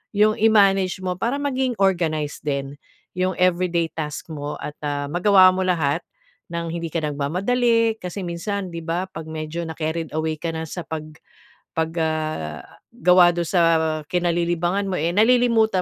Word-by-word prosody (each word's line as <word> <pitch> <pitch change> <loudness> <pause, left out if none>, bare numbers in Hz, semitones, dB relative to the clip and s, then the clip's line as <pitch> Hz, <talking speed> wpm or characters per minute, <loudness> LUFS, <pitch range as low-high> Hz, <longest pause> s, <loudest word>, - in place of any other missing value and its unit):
'yong 215 +1 +4
i-manage 195 -4 +4
mo 180 -1 -1
para 240 +7 0
maging 260 -3 -1
organized 160 -6 0
din 140 -1 -2 0.4
'yong 185 +1 -1
everyday 175 -2 +1
task 150 0 -5
mo 145 -1 -5
at, 150 - -5
ah, 145 -1 -2
magawa 185 +2 +6
mo 185 +1 -2
lahat 165 -4 +1 0.5
nang 170 0 -4
hindi 170 -1 -3
ka 160 0 -3
nagmamadali. 220 - +1
Kasi 180 +2 -6
minsan 185 +2 -4
'di 170 - -5
ba 170 +3 -2
'pag 160 -2 -8
medyo 160 +1 -4
na-carried 160 0 -3
away 155 0 -1
ka 170 - -3
na 160 - -3
sa 175 - -5
pag 160 -1 -4 0.7
'pag, 160 0 -1
ah, 155 - -2 0.3
gawa 180 -6 +5
don 175 - 0
sa 175 0 +2 0.5
kinalilibangan 175 +2 0
mo - - -2
eh, 165 +3 +1
nalilimutan 225 -3 +4
175 Hz, 155 wpm, -22 LUFS, 160-195 Hz, 0.7 s, magawa